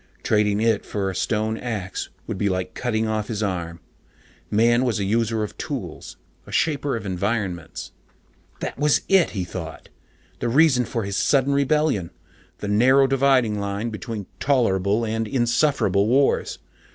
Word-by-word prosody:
Trading 105 -1 +2
it 115 -2 +2
for 95 -2 -2
a - - -9
stone 110 +3 -1
axe 105 -6 -4 0.2
would - - -5
be 100 - +1
like 90 0 -2
cutting 110 -3 -1
off 110 -1 -1
his 110 -2 -3
arm. 85 -4 -3 0.7
Man 120 +3 +3
was 120 -5 0
a - - 0
user 110 +2 0
of 105 - -6
tools, - - -6 0.3
a - - -10
shaper 145 -4 0
of 115 - -5
environments. 95 -2 -3 0.7
That - - -4
was 150 0 +3
it, 190 -3 +4
he 95 - 0
thought. 85 -2 -8 0.5
The 120 - -1
reason 130 -2 +4
for 115 -1 -3
his 100 0 -3
sudden 140 0 +2
rebellion, 140 - +1 0.5
the 105 - -5
narrow 130 +7 +5
dividing 130 -5 +2
line 100 +3 -3
between 110 -2 -5
tolerable 115 -5 +2
and 110 0 -2
insufferable 120 -5 +2
wars. 135 +4 +2
110 Hz, 150 wpm, -23 LUFS, 100-125 Hz, 0.7 s, narrow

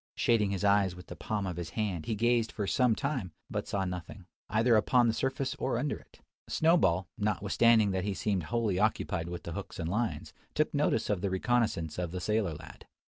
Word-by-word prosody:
Shading 110 -4 +2
his 100 0 -2
eyes 100 -3 +3
with 90 - -11
the - - -9
palm 105 -2 -3
of 90 -2 -4
his 85 -2 -4
hand, 95 -7 -2
he 110 - 0
gazed 120 +1 +2
for 105 - -3
some 125 +2 +3
time, 130 - -3 0.2
but - - -3
saw 100 -1 -1
nothing, 90 +1 -6 0.2
either 115 +3 +3
upon 120 +3 +4
the 115 - +2
surface 135 +2 -1
or 130 - 0
under 145 - -1
it. - - -17 0.3
Snowball, 95 - +3
notwithstanding 105 +1 +3
that 95 -1 -1
he 100 -1 -2
seemed 95 -6 -1
wholly 110 -4 0
occupied 90 -5 0
with 85 0 -6
the 85 - -6
hooks - - -6
and 85 0 -3
lines, 110 +5 -2 0.2
took - - +1
notice - - +1
of 100 -4 -1
the 100 - 0
reconnoissance 95 -5 0
of 90 -2 -2
the 90 +2 -4
sailor 105 -3 0
lad. 75 - -12
105 Hz, 205 wpm, -30 LUFS, 90-115 Hz, 0.3 s, upon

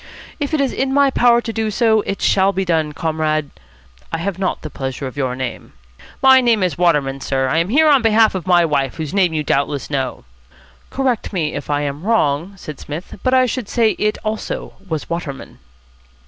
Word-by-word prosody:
"If 285 -2 -2
it - - 0
is 275 -2 0
in 265 0 -1
my 280 -1 +4
power 240 -2 +4
to 230 -1 -5
do 220 -1 -1
so, 220 +1 +2
it 195 - -3
shall 195 0 +3
be 195 -1 -2
done, 160 -3 0
Comrade 155 -1 -1 0.6
I - - -1
have 185 +2 -3
not 190 - -2
the 155 - -6
pleasure 135 0 -5
of 130 - -6
your 130 -3 -1
name." 130 -2 -6 0.5
"My 265 0 +7
name 230 -5 +2
is 180 -5 0
Waterman, 145 -5 +1
sir. 135 0 0
I 155 +5 +1
am 170 +3 0
here 310 +7 +4
on 285 -3 +5
behalf 225 -1 +4
of 185 -1 -5
my 175 -2 +5
wife, 140 -4 0
whose 155 -3 -5
name 190 -4 +3
you 155 -1 -1
doubtless 140 -1 -1
know." 135 - -3 0.6
"Correct 260 -4 -1
me 165 -6 -1
if 145 - -6
I 145 0 +1
am 145 0 -3
wrong," 180 -4 +1
said 155 -5 -9
Psmith, 160 +6 -8
"but 255 0 +2
I 255 0 +5
should 250 -3 -3
say 230 -3 +3
it, 210 0 0
also, 215 0 -4 0.2
was 160 -2 -3
Waterman." 170 -5 -6
175 Hz, 205 wpm, -19 LUFS, 145-225 Hz, 0.6 s, My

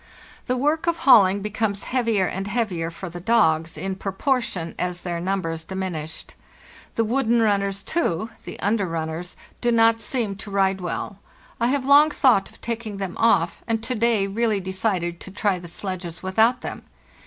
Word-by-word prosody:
The 255 - 0
work 300 +6 0
of 340 -1 +2
hauling 200 - +5
becomes 210 -1 -2
heavier 230 -6 +1
and 195 +2 -3
heavier 200 -8 -1
for 180 +3 -8
the 175 0 -7
dogs, 165 -6 +2
in 195 0 -2
proportion 195 - -1
as 180 -1 -2
their 175 -2 -3
numbers 170 -3 -2
diminished. 170 -4 -5 0.6
The 230 - +2
wooden 235 0 +2
runners, 200 -2 +1
too 220 - -1
(the - - -8
under 205 -1 +1
runners), 165 +2 -4 0.2
do 240 - +2
not 225 0 +4
seem 220 -4 -1
to 210 0 -8
ride 195 -1 +1
well. 180 +2 -4 0.4
I 235 - +2
have 265 +1 0
long 290 +2 +7
thought 250 -10 +3
of - - -19
taking 225 -3 -4
them 195 -3 -4
off, 230 0 +3
and 225 -1 -1
to 255 - -2
day 230 -3 +2
really 215 +1 0
decided 185 -2 -2
to - - -8
try 195 -1 0
the 175 - -10
sledges 175 -1 -6
without 225 +6 +3
them. - - -6
200 Hz, 170 wpm, -23 LUFS, 180-230 Hz, 0.6 s, long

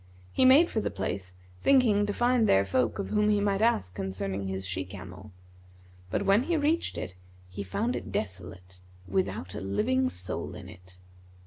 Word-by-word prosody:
He 260 - +3
made 280 +6 +7
for 220 - 0
the - - -1
place 95 -2 -4 0.3
thinking 220 -7 +4
to - - 0
find 240 0 +2
there 95 +1 +4
folk 120 +6 0
of 200 - -4
whom 210 0 +2
he 210 -1 +3
might 200 0 +1
ask 100 - +2
concerning 95 +1 -3
his 95 0 -4
she 95 0 -2
camel; 95 +2 -10 0.8
but, 200 - -1
when 200 +3 +5
he 335 +5 0
reached 310 +3 0
it, - - -5 0.4
he 95 +2 -6
found 215 - -2
it - - -6
desolate, 90 -2 -5 0.3
without 95 0 -2
a - - -5
living 255 - +1
soul 90 - -4
in - - -9
it. 90 0 -14
100 Hz, 180 wpm, -28 LUFS, -, 0.8 s, made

